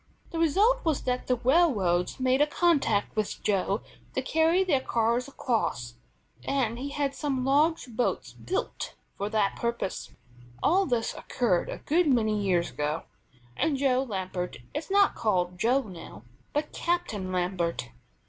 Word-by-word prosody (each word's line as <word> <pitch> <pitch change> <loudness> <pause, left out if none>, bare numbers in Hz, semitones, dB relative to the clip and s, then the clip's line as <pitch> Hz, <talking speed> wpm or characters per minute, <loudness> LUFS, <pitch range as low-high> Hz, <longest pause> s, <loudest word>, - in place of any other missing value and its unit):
The 330 - -3
result 410 +10 +3
was 315 -4 0
that 250 0 -1
the 250 - +3
railroads 240 - +2
made 260 +1 +2
a 295 - +5
contract 290 - +2
with 215 -1 -2
Joe 200 0 +1 0.3
to - - +1
carry 320 +6 +3
their 295 -8 +2
cars 235 +1 +1
across, 220 - -2 0.5
and 245 -4 0
he 275 +2 -4
had 280 -1 -1
some 275 -3 -2
large 300 +4 +3
boats 240 0 -2
built 380 +2 -4 0.2
for 200 +1 -3
that 210 -2 +1
purpose. 235 -4 -3 0.5
All 380 +4 +3
this 240 -4 0
occurred 200 -8 0
a - - -4
good 335 +3 +1
many 220 -6 +2
years 180 -3 +1
ago, 150 +2 -2 0.5
and 290 - +1
Joe 265 -2 +2
Lambert 185 - -4 0.2
is 315 - -4
not 400 0 +4
called 180 -4 0
Joe 250 +6 +3
now, 165 - -10 0.3
but 300 +1 -2
Captain 225 - -1
Lambert. 175 - -1
250 Hz, 150 wpm, -28 LUFS, 195-295 Hz, 0.5 s, a